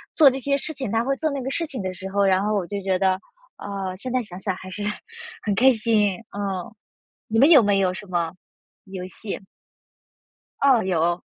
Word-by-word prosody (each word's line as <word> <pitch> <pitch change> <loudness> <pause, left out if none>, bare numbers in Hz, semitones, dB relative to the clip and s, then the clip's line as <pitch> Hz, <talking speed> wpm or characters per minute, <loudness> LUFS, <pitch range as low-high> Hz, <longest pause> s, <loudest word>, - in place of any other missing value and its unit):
做 300 -4 +8
这 265 - -4
些 280 +2 +1
事 315 +3 -4
情。 265 -6 -4
他 225 +2 +1
会 270 +1 0
做 315 -1 0
那 275 - -3
个 265 - -2
事 330 +1 -1
情 260 -8 -5
的 185 0 -3
时 190 +1 -7
候， 200 +1 +1
然 190 -1 +3
后 215 - +1
我 195 -4 0
就 200 +2 -4
觉 190 -1 +1
得， 190 0 +2 0.4
啊， 195 -2 -4
现 255 +6 -6
在 255 -2 +1
想 185 -3 -9
想 190 -1 -2
还 185 0 -10
是 205 +2 -5 0.6
很 205 - 0
开 255 +6 +6
心， 215 -4 +2
啊。 195 -2 -3 0.6
你 225 +1 +1
们 280 +5 +7
有 300 -6 +9
没 205 -1 +3
有 185 -1 +2
什 205 - -8
么 170 -3 -1 0.5
游 190 -2 -6
戏？ 195 +3 -6 1.2
哦， 265 -5 +4
有。 175 -1 +1
200 Hz, 225 characters per minute, -23 LUFS, 185-255 Hz, 1.2 s, 有